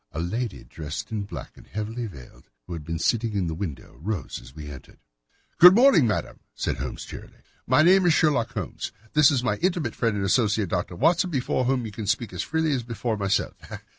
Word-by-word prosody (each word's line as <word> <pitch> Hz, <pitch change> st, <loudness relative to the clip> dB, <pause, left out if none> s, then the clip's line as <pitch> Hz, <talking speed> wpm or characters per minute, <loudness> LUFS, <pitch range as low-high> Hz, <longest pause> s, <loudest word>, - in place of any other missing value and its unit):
A 80 Hz, -, -4 dB
lady 110 Hz, +6 st, -3 dB
dressed 75 Hz, +4 st, -7 dB
in 105 Hz, -2 st, -2 dB
black -, -, -8 dB
and -, -, -16 dB
heavily 110 Hz, +3 st, -4 dB
veiled, 70 Hz, -, -14 dB, 0.2 s
who 90 Hz, -, -7 dB
had 80 Hz, -3 st, -6 dB
been 80 Hz, +2 st, -3 dB
sitting 115 Hz, +6 st, 0 dB
in 100 Hz, -3 st, 0 dB
the 80 Hz, -, -2 dB
window, 80 Hz, -4 st, -6 dB
rose 100 Hz, -1 st, -3 dB
as 65 Hz, -, -15 dB
we 75 Hz, -2 st, -8 dB
entered. 70 Hz, -3 st, -11 dB, 0.6 s
"Good 180 Hz, +2 st, +10 dB
morning, 230 Hz, -, +6 dB
madam," 105 Hz, -, -2 dB, 0.2 s
said -, -, -2 dB
Holmes -, -, -5 dB
cheerily. -, -, -11 dB, 0.2 s
"My 130 Hz, +5 st, +5 dB
name 185 Hz, +2 st, +5 dB
is 170 Hz, -, +5 dB
Sherlock 145 Hz, -7 st, +2 dB
Holmes. -, -, -4 dB, 0.2 s
This 150 Hz, -2 st, +6 dB
is 135 Hz, -5 st, +1 dB
my 125 Hz, -, 0 dB
intimate 170 Hz, -, 0 dB
friend 115 Hz, -3 st, 0 dB
and 100 Hz, -, -1 dB
associate, 105 Hz, -1 st, +2 dB
Dr. 90 Hz, 0 st, -2 dB
Watson, 175 Hz, -, +3 dB
before 130 Hz, -4 st, 0 dB
whom 130 Hz, -2 st, +1 dB
you 110 Hz, -, -6 dB
can 105 Hz, 0 st, -6 dB
speak 115 Hz, +2 st, -1 dB
as -, -, -2 dB
freely 160 Hz, 0 st, 0 dB
as 135 Hz, -3 st, 0 dB
before 115 Hz, -1 st, -3 dB
myself. 100 Hz, -1 st, 0 dB
115 Hz, 210 wpm, -25 LUFS, 95-140 Hz, 0.6 s, Good